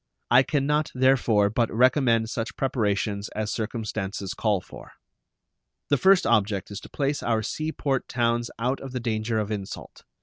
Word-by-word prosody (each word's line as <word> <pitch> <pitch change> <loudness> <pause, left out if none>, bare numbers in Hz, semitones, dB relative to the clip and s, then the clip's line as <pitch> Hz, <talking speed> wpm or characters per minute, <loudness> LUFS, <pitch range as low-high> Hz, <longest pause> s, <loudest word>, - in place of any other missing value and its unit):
I 125 +2 +8
can 140 0 0
not, 150 +1 +1
therefore, 120 -6 +3
but 115 +1 0
recommend 125 -1 +3
such 120 +2 -4
preparations 105 -5 -1
as 110 0 -2
circumstances 105 -3 -4
call 105 -3 +1
for. - - -13 1.0
The 145 - +3
first 190 +4 +5
object 105 -4 +1
is 100 - -5
to - - -13
place 140 0 -1
our 110 -2 0
sea 155 +8 -3
port 135 -4 -2
towns 120 -1 0
out 125 +4 -1
of 135 -1 -8
the 125 - -2
danger 110 -1 -1
of 105 0 -2
insult. 100 -2 -7
115 Hz, 165 wpm, -25 LUFS, 105-130 Hz, 1.0 s, I